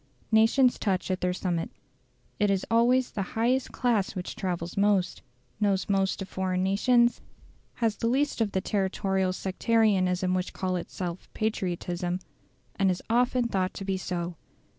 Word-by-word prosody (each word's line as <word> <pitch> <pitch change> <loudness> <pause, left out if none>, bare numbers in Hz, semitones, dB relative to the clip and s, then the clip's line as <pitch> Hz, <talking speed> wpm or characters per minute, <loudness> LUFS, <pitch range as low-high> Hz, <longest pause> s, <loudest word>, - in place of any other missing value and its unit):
Nations 225 +4 +4
touch 190 -3 0
at 185 - -2
their 180 - +1
summits. 180 -2 -2 0.6
It 205 -1 +3
is 195 -1 +1
always 245 +2 +3
the 205 - -3 0.2
highest 250 +3 +1
class 225 -6 0
which 180 -1 -5
travels 175 -2 -3
most, 200 -2 +1 0.4
knows 195 -3 +1
most 195 -1 +1
of - - -9
foreign 185 -1 -1
nations, 235 +5 +3 0.5
has 225 -3 0
the 230 - -1
least 270 +1 +1
of 215 -3 0
the 190 - +1
territorial 190 -1 0
sectarianism 185 -2 +1
which 185 0 -2
calls 185 -1 -1
itself 175 0 -6
patriotism, 180 -4 -2 0.6
and 195 -1 +3
is 180 -1 -2
often 245 +1 +2
thought 190 -4 -1
to 195 - -6
be 195 0 0
so. 175 -2 -4
195 Hz, 150 wpm, -27 LUFS, 185-225 Hz, 0.6 s, Nations